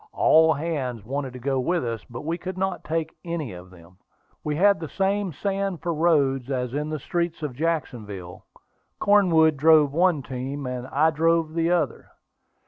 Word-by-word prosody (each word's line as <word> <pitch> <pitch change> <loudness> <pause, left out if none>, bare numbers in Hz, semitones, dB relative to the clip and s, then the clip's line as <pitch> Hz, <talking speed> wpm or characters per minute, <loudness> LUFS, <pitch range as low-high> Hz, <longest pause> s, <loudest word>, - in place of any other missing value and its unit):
All 160 0 +5
hands 135 -8 -3
wanted 135 +1 -4
to - - -8
go 135 +1 -1
with 170 +4 0
us, 115 -2 -4
but 120 +4 -8
we 165 +2 -1
could 185 0 -6
not 190 -1 -2
take 160 0 -3
any 165 - -4
of 90 +1 -11
them. 90 0 -17 0.5
We 150 -1 -2
had 200 +4 +4
the 160 - -6
same 195 0 0
sand 195 +3 -3
for 170 - -1
roads 140 -5 +2
as 125 -2 -2
in 150 +2 -2
the 155 - -2
streets 170 +2 -3
of 145 -4 -3
Jacksonville. 115 - -4 0.6
Cornwood 165 -7 +4
drove 150 -1 +5
one 170 -3 +2
team, 135 +2 -5
and 125 0 -4
I 155 +4 +2
drove 165 0 +1
the 165 0 +1
other. 165 -8 0
155 Hz, 175 wpm, -24 LUFS, 130-170 Hz, 0.6 s, All